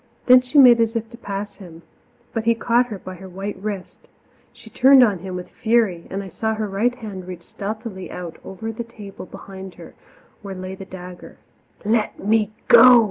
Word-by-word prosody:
Then 250 0 +8
she 250 +4 -2
made 245 -4 +8
as 225 0 0
if 230 0 -3
to 235 - -11
pass 200 -2 -6
him, 170 -3 -13 0.5
but 225 -2 -2
he 230 0 +4
caught 235 +2 +2
her 215 -4 -6
by 185 0 -9
her 190 +1 -11
white 195 +3 -5
wrist; 200 -3 -6 0.4
she - - -17
turned 265 0 +7
on 205 -6 +2
him 185 +1 -6
with 180 0 -7
fury, 220 -7 +1
and 195 +1 -4
I - - -8
saw 220 +5 -2
her 215 -1 -2
right 215 +5 0
hand 200 -7 -8
reach 180 -2 -8
stealthily 205 0 -6
out 175 -2 -7
over 220 +4 -6
the 225 +2 -5
table 210 -5 -11
behind 190 +1 -10
her, - - -12 0.5
where 200 -2 -7
lay 185 0 -6
the 190 0 -9
dagger. 180 -1 -11 0.5
"Let 215 0 +1
me 215 0 +1 0.2
go!" 250 -1 +9
205 Hz, 195 wpm, -21 LUFS, 190-230 Hz, 0.5 s, go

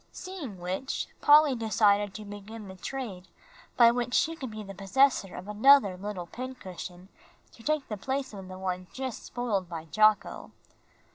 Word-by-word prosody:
Seeing 345 - -7
which, 185 +9 -3 0.2
Polly 295 -1 +7
decided 205 -3 +2
to 215 - -7
begin 205 +1 -9
the 190 - -9
trade 190 -2 -6 0.5
by 235 -1 +8
which 245 +1 -1
she 325 +1 +2
could 265 -6 -6
be 215 -1 -7
the 195 -1 -8
possessor 195 +1 +2
of 185 - -8
another 210 -1 +5
little 190 -1 -5
pincushion 185 -6 -8 0.4
to - - -17
take 305 +2 -1
the 210 - -4
place 265 +4 -3
of 195 -2 -8
the 185 0 -8
one 185 -1 -3
just 260 -3 -4
spoiled 210 -7 -2
by 165 -2 -6
Jocko. 215 +5 +2
210 Hz, 160 wpm, -29 LUFS, 190-260 Hz, 0.5 s, by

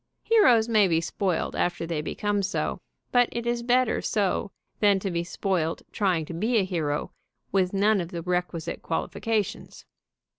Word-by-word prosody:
Heroes 250 - +5
may 215 -4 +4
be 165 -2 +2
spoiled 180 +1 -2
after 175 -1 -1
they 165 -2 -2
become 205 +6 -1
so, 195 +1 -2 0.3
but 245 -1 +4
it 235 0 -4
is 240 0 0
better 250 0 +2
so 200 -2 0 0.3
than 205 -2 +4
to 195 0 -3
be 170 0 -1
spoiled 175 -2 -2
trying 180 -6 +1
to 170 - -7
be 220 +8 +1
a 205 - +3
hero 160 -6 -2 0.4
with 185 -2 +2
none 200 0 +3
of 170 - -5
the 170 -3 -5
requisite 180 -2 -2
qualifications. 210 +5 -3
195 Hz, 160 wpm, -26 LUFS, 170-220 Hz, 0.4 s, Heroes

